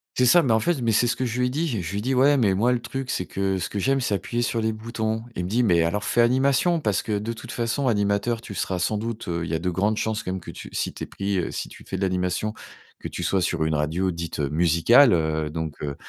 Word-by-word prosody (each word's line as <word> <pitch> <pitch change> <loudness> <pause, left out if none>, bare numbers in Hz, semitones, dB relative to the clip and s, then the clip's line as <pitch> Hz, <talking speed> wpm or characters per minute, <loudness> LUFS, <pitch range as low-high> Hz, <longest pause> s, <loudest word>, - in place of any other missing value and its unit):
C'est 125 - +3
ça, 175 +6 +6
mais 130 - +1
en 110 - +4
fait, 165 +6 0
mais 115 - +2
c'est 115 +3 +3
ce 120 - 0
que 130 - -2
je 120 0 -3
lui 125 - +2
ai - - -1
dit. 155 +6 -1
Je 115 - -2
je 85 0 -5
lui 100 - -1
dis: 130 +3 0
«Ouais, 140 +3 +4
mais 105 -7 +3
moi, 110 +6 +2
le 125 - +1
truc, 130 +3 -5
c'est 90 - -1
que 95 0 -1
ce 90 - -2
que 105 - -4
j'aime, 135 +7 +2
c'est 125 -5 -1
appuyer 120 +4 -1
sur 115 -1 -1
les 110 0 +1
boutons». 110 0 -3
Il 90 - -2
me - - -4
dit: 120 +5 +2
«Mais 85 -7 +4
alors 85 +5 0
fait 120 - +2
animation 135 +8 +3
parce 105 -10 0
que, 105 -2 -2
de 110 +3 -3
toutes 115 - -9
façons, 120 +3 -1
animateur, 105 +1 +1
tu 110 - -9
seras 95 -1 -2
sans 105 +4 0
doute, 115 +1 -5
heu, 85 -1 -2
il 85 - -5
y 80 - 0
a - - -1
de 90 +2 -1
grandes 105 +5 0
chances, 110 0 -1
quand 95 - -4
même, 95 - -3
que - - -8
tu - - -10
si - - -2
tu - - -7
es - - -18
pris, 100 0 -2
heu, 85 - -2
si - - -4
tu - - -13
fais 95 - -5
de 95 - -2
l'animation, 90 +3 -1 0.5
que - - -5
tu - - -6
sois 95 - +1
sur 85 -2 0
une 80 0 0
radio 80 +5 0
dite, 85 -1 -5
heu, 70 -2 0
musicale», 85 - +5
heu, 80 -2 0
donc 80 -1 -5
heu, 70 -1 -3
105 Hz, 305 wpm, -24 LUFS, 90-120 Hz, 0.5 s, ça